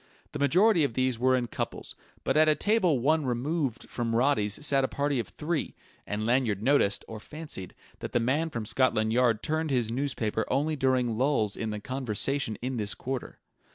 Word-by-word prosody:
The -, -, -5 dB
majority 175 Hz, -, +4 dB
of 135 Hz, -5 st, -1 dB
these 130 Hz, -2 st, 0 dB
were 130 Hz, +1 st, +3 dB
in 125 Hz, -1 st, 0 dB
couples, 115 Hz, -, -5 dB, 0.3 s
but -, -, 0 dB
at 155 Hz, 0 st, +5 dB
a 155 Hz, -, +4 dB
table 195 Hz, -8 st, +2 dB
one 155 Hz, +5 st, +2 dB
removed 130 Hz, 0 st, -2 dB
from 115 Hz, -2 st, -2 dB
Roddy's 120 Hz, -1 st, +2 dB
sat 140 Hz, -2 st, +4 dB
a -, -, +2 dB
party 140 Hz, -1 st, -1 dB
of 115 Hz, -, -3 dB
three; 150 Hz, -, -3 dB, 0.3 s
and 105 Hz, +1 st, -2 dB
Lanyard 115 Hz, -4 st, +1 dB
noticed, 130 Hz, -6 st, +2 dB
or 110 Hz, -1 st, -7 dB
fancied, 150 Hz, -, -7 dB, 0.2 s
that -, -, -6 dB
the 120 Hz, -, +2 dB
man 145 Hz, +8 st, 0 dB
from 115 Hz, -7 st, -4 dB
Scotland 110 Hz, -2 st, +1 dB
Yard 120 Hz, -3 st, +2 dB
turned 160 Hz, 0 st, -1 dB
his 120 Hz, -5 st, 0 dB
newspaper 115 Hz, -4 st, -1 dB
only 150 Hz, +4 st, 0 dB
during 130 Hz, -4 st, +1 dB
lulls 125 Hz, -7 st, +1 dB
in 110 Hz, -, -3 dB
the 105 Hz, -1 st, -4 dB
conversation 130 Hz, 0 st, -1 dB
in 130 Hz, 0 st, -2 dB
this 105 Hz, -2 st, -2 dB
quarter. 130 Hz, 0 st, -5 dB
130 Hz, 190 wpm, -28 LUFS, 115-145 Hz, 0.3 s, at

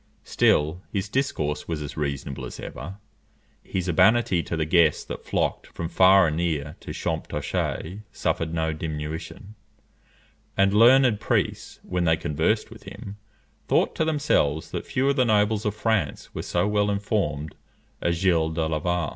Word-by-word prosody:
Still 80 Hz, +4 st, +2 dB
his 100 Hz, -1 st, -2 dB
discourse 80 Hz, -, -2 dB
was 80 Hz, -2 st, -2 dB
as 70 Hz, -, -7 dB
reasonable 70 Hz, -2 st, -3 dB
as 60 Hz, -, -7 dB
ever, 80 Hz, +11 st, -7 dB, 0.7 s
his 95 Hz, -1 st, -3 dB
urbanity 95 Hz, +1 st, +4 dB
to 80 Hz, -, -4 dB
the 80 Hz, -, 0 dB
guests 80 Hz, -2 st, +3 dB
that -, -, -7 dB
flocked -, -, -1 dB
from 85 Hz, -1 st, -5 dB
far 95 Hz, +2 st, +6 dB
and 80 Hz, -1 st, -1 dB
near 80 Hz, -4 st, -2 dB
to -, -, -12 dB
Champtocé 85 Hz, +3 st, -3 dB
suffered 80 Hz, -1 st, -1 dB
no 80 Hz, -1 st, -1 dB
diminution; 80 Hz, +5 st, -6 dB, 1.0 s
and 95 Hz, 0 st, +4 dB
learned 120 Hz, 0 st, +6 dB
priests, -, -, -1 dB
when 90 Hz, -1 st, -1 dB
they 80 Hz, -1 st, +3 dB
conversed 80 Hz, +11 st, 0 dB
with 115 Hz, -, -12 dB
him, 100 Hz, +1 st, -9 dB, 0.5 s
thought -, -, +2 dB
to -, -, 0 dB
themselves 145 Hz, -, +1 dB
that -, -, -5 dB
few 130 Hz, +2 st, 0 dB
of 140 Hz, +1 st, +2 dB
the 130 Hz, -, +5 dB
nobles 105 Hz, -1 st, +2 dB
of 105 Hz, -1 st, -1 dB
France 110 Hz, -8 st, -1 dB
were -, -, -4 dB
so 90 Hz, +3 st, 0 dB
well 105 Hz, 0 st, +1 dB
informed 100 Hz, -8 st, -1 dB, 0.5 s
as 85 Hz, -, +1 dB
Gilles 85 Hz, -3 st, +2 dB
de 80 Hz, -1 st, 0 dB
Laval. 85 Hz, +2 st, -1 dB
85 Hz, 155 wpm, -25 LUFS, 80-105 Hz, 1.0 s, far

